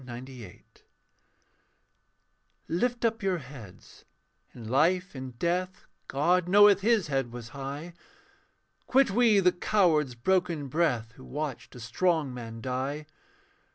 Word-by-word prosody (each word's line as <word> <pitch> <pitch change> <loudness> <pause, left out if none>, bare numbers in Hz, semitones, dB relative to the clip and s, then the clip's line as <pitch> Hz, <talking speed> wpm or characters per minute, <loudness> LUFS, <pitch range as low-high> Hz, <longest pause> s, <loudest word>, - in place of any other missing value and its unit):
May 125 -1 -9
1898) 125 -5 -12 1.8
Lift 240 +8 -1
up 225 0 0
your 190 -2 0
heads: 125 - -13 0.5
in 115 -3 -10
life, 170 - +1
in 130 -1 -7
death, 180 +7 -2 0.2
God 175 +6 +1
knoweth 205 0 +6
his 220 -2 +2
head 135 -5 -2
was 120 -1 -8
high. 140 +6 -7 0.9
Quit 265 -3 +3
we 225 -1 +4
the 180 -1 +4
coward's 165 - +1
broken 170 +1 0
breath 125 -8 0
Who 130 - -13
watched 135 -6 -6
a - - -9
strong 150 +4 0
man 115 -2 -8
die. 135 +4 -3
150 Hz, 120 wpm, -28 LUFS, 125-185 Hz, 1.8 s, knoweth